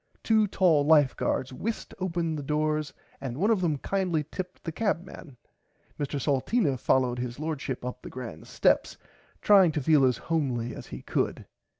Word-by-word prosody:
Two 220 -2 +3
tall 175 -7 +3
life 145 -3 +5
guards 130 0 -1
whisked 220 - -4
open 170 -3 -1
the 150 - -4
doors 150 +1 -1 0.3
and 130 -2 -5
one 205 +8 +2
of 210 -4 +2
them 160 -5 +1
kindly 180 -1 -1
tipped 185 -1 -6
the 165 - -3
cabman. 175 - -3 0.6
Mr 145 0 -2
Salteena 140 - +1
followed 125 -1 +2
his 125 +1 -4
lordship 145 -5 -4
up 125 0 -5
the - - -9
grand 120 -11 -8
steps - - +1 0.5
trying 195 -5 +6
to 150 - 0
feel 150 -1 +5
as 125 -2 +3
homely 130 -8 -1
as - - -9
he - - -8
could. - - -1
155 Hz, 170 wpm, -27 LUFS, 130-180 Hz, 0.6 s, trying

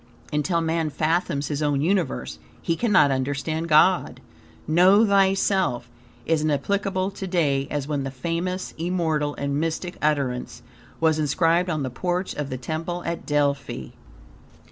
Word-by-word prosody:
Until 165 +3 +1
man 165 -1 0
fathoms 155 -2 0
his 145 0 -2
own 145 -2 +1
universe, 180 +2 -1 0.2
he 165 - 0
cannot 200 - +4
understand 140 +5 -2
God. 170 +4 +4 0.5
"Know 185 +7 +5
thyself" 195 - +2 0.3
is 160 -1 +1
as 155 - +1
applicable 190 +5 0
to 195 -1 -6
day 145 -7 +1
as 145 -2 -3
when 145 -2 -1
the 135 - -3
famous, 170 +7 -3
immortal 160 -4 0
and 140 0 -2
mystic 165 +2 -3
utterance 140 -5 -1 0.4
was 160 -1 +2
inscribed 165 +4 +2
on 155 -4 -1
the 130 - -3
porch 180 +7 -2
of 145 -2 -4
the 130 - -4
temple 165 +6 -4
at 170 0 -4
Delphi. 140 - -1
160 Hz, 145 wpm, -24 LUFS, 145-180 Hz, 0.5 s, Know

